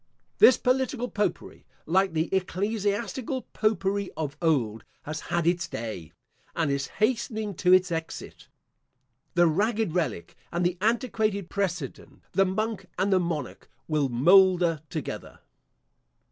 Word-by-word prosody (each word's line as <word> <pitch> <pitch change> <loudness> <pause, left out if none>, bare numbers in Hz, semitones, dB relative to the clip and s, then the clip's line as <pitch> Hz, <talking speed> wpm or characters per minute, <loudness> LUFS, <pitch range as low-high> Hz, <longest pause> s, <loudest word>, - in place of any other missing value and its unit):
This 255 - +8
political 255 -1 0
popery, 210 -1 -2 0.2
like 190 +2 +2
the 160 +3 -1
ecclesiastical 205 +7 -1
popery 200 -2 0
of 150 -3 -3
old, 120 -10 +1 0.2
has 155 +2 -5
had 170 -1 -2
its 170 0 +1
day, 110 - -6 0.4
and 160 -4 +1
is 140 0 -1
hastening 215 -1 0
to 180 - +3
its 185 -1 +5
exit. 165 -1 -5 0.9
The 175 0 +5
ragged 205 +3 +1
relic 130 - -2 0.2
and 175 +1 0
the 175 0 0
antiquated 215 -4 0
precedent, 195 -3 -4
the 195 - +3
monk 195 0 -2
and 190 +2 +2
the 185 - +4
monarch, 165 -7 -4 0.2
will 150 -4 +1
moulder 175 +4 +5
together. - - -6
185 Hz, 125 wpm, -27 LUFS, 160-210 Hz, 0.9 s, This